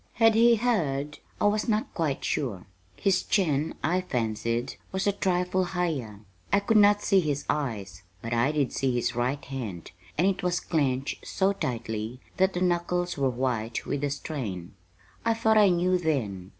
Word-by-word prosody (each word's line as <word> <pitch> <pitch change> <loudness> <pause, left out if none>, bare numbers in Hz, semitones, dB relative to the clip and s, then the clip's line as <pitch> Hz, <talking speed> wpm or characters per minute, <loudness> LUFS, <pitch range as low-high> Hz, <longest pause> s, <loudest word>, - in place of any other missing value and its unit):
Had 225 -1 +5
he 235 +2 +6
heard? 150 - -1 0.2
I - - +1
was 210 +1 +2
not 215 -1 0
quite 155 -5 -1
sure. 115 -11 -2 0.3
His 195 -2 +2
chin, 155 -6 0
I 180 +4 +2
fancied, 115 -5 -2 0.2
was 190 0 -1
a 205 - +4
trifle 185 -1 0
higher. 160 - -2 0.3
I 200 - +5
could 220 +2 +3
not 205 0 +5
see 195 -2 +4
his 145 -4 -1
eyes, 105 -11 -3 0.2
but 115 +4 -4
I 120 +5 +2
did 145 -4 0
see 130 -2 0
his 120 0 0
right 125 +4 -1
hand; 115 -11 -6 0.3
and 170 - +3
it 195 -1 +1
was 180 -1 0
clenched 135 -4 -1
so 195 +1 +1
tightly 115 - -4 0.2
that 190 0 +3
the 180 - -2
knuckles 175 0 0
were 135 -2 +1
white 120 -3 -2
with 145 - -2
the 145 - 0
strain. 115 - -5 0.5
I 230 0 +2
thought 220 -1 +4
I 205 -2 +6
knew 180 +1 +2
then. 110 - -2
150 Hz, 175 wpm, -27 LUFS, 120-190 Hz, 0.5 s, he